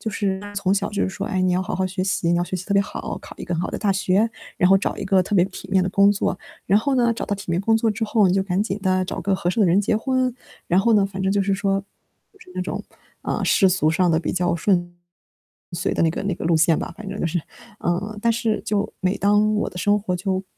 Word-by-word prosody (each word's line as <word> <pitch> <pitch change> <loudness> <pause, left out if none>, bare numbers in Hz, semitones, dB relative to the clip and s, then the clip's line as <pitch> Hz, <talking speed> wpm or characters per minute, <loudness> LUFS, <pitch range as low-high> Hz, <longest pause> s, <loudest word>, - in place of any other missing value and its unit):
就 220 - -3
是 195 -2 -1 0.2
从 195 -1 +1
小 200 0 -1
就 205 - -2
是 - - -1
说， - - -5
哎， 185 -1 -1
你 185 -1 +2
要 185 - +1
好 185 - -4
好 190 - 0
学 185 0 -2
习， 190 -3 0
你 175 - +3
要 175 - +1
学 175 +2 -4
习 185 0 -6
特 200 - -1
别 200 - +5
好， - - -5
考 - - -12
一 - - -7
个 175 - -3
很 165 - -1
好 - - -2
的 - - -4
大 200 -2 +1
学， 195 +3 +2 0.3
然 180 - +4
后 195 - +7
找 - - -2
一 - - -4
个 190 -1 +3
特 195 - -5
别 180 0 +5
体 190 0 -10
面 190 -1 +4
的 185 - -1
工 200 +1 +5
作， 200 -2 -1 0.3
然 200 - +4
后 270 +4 0
呢， 235 -2 +3
找 - - -4
到 205 - -1
体 195 -3 -9
面 170 - +1
工 225 +2 +3
作 225 0 +1
之 220 +2 -2
后， 210 -2 +3
你 180 - +2
就 195 0 +2
赶 190 0 0
紧 205 -2 -2
地 185 -1 +1
找 - - -4
个 195 +3 0
合 175 - -1
适 200 - -2
的 205 - +5
人 180 +2 +4
结 205 +1 +1
婚， 255 +2 0 0.3
然 180 - +3
后 230 +3 +3
呢， 205 -2 +4
反 195 -1 -6
正 190 0 +1
就 200 0 +2
是 195 0 +1
说， 195 0 0 0.5
就 400 - -24
是 185 - -15
那 185 - -1
种， 180 - -4 0.4
啊， - - -2
世 195 - +4
俗 175 -4 +2
上 175 +2 +2
的 160 - +3
比 - - -3
较 175 -2 +1
顺 175 0 0 0.8
遂 170 +2 -2
的 - - +1
那 165 - +3
个 - - -4
那 195 -1 -1
个 - - -7
路 165 -1 +3
线 160 0 +4
吧， - - -5
反 215 -1 -9
正 195 +1 -5
就 - - 0
是。 175 +2 -1 0.4
呃， 200 +5 -2
但 230 +1 +3
是 225 -1 -1
就 205 -1 -1
每 185 +1 0
当 210 +1 +3
我 210 - -1
的 180 - -10
生 205 +3 +2
活 190 -3 -2
就 190 +1 -2
195 Hz, 320 characters per minute, -22 LUFS, 180-205 Hz, 0.8 s, 后